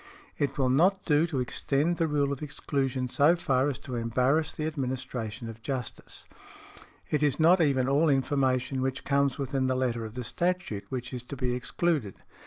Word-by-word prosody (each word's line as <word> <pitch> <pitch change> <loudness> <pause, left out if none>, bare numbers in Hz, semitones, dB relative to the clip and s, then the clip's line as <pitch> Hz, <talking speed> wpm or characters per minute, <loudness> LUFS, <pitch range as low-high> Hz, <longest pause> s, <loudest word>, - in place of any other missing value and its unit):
"It 140 -1 -1
will 130 -2 +2
not 185 +8 +3
do 155 +1 +3
to 145 -6 -2
extend 140 +6 0
the 165 - +1
rule 145 -2 +1
of 140 - -7
exclusion 135 -3 -2
so 145 +6 +4
far 135 -4 +1
as 140 - -3
to 130 - -6
embarrass 125 +7 +1
the 155 - -4
administration 130 -6 -4
of 115 0 -9
justice. 130 -1 -5 0.8
It 150 - +1
is 145 -1 +1
not 170 +3 +6
even 135 -4 +2
all 145 +4 +3
information 135 -1 +1
which 130 0 -2
comes 140 -1 +1
within 135 -1 -1
the 130 - +1
letter 120 -3 -1
of 110 0 -8
the 125 - -4
statute 175 - -2
which 125 -1 -5
is 125 - -4
to 125 +4 -8
be 125 -2 -1
excluded. 125 - -1
135 Hz, 185 wpm, -28 LUFS, 125-150 Hz, 0.8 s, not